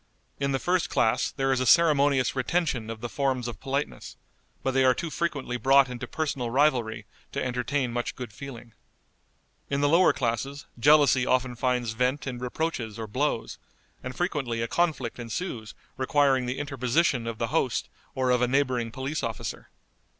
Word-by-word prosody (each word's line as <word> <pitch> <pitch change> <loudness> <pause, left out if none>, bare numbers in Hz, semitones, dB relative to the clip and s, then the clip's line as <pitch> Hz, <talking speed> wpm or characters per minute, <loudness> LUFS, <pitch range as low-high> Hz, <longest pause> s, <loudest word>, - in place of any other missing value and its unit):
In 140 0 0
the 135 - +1
first 180 +5 0
class 120 +3 +2
there 135 -1 -1
is 130 - +2
a 130 - 0
ceremonious 145 -6 +4
retention 130 -4 0
of 115 -1 -6
the 120 - -3
forms 130 -1 -1
of 120 - -6
politeness, 140 +2 -4 0.5
but 135 - +1
they 135 0 +3
are 130 -1 +5
too 165 +2 -4
frequently 145 -8 -2
brought 135 +1 +5
into 125 0 -6
personal 140 -6 -2
rivalry 125 -4 +1 0.3
to - - -2
entertain 125 0 -1
much 120 0 -2
good 125 -5 -7
feeling. 120 -3 -9 1.0
In 140 0 0
the 145 - +4
lower 170 +5 +5
classes 135 +4 -2
jealousy 145 -2 +5
often 130 -1 +1
finds 125 -1 0
vent 125 +5 0
in 125 -3 -4
reproaches 125 -4 -3
or 115 - -4
blows, 125 +2 -2 0.4
and 130 0 -6
frequently 135 -10 -1
a - - -1
conflict 150 -7 -1
ensues 115 - -5 0.2
requiring 130 -1 +2
the 125 - -2
interposition 135 -2 0
of 115 -1 -4
the - - -2
host - - +1 0.3
or 130 -1 +1
of 125 -1 +3
a 125 - +3
neighboring 125 -3 +1
police 135 +5 -3
officer. 115 -3 -5
130 Hz, 170 wpm, -27 LUFS, 120-140 Hz, 1.0 s, are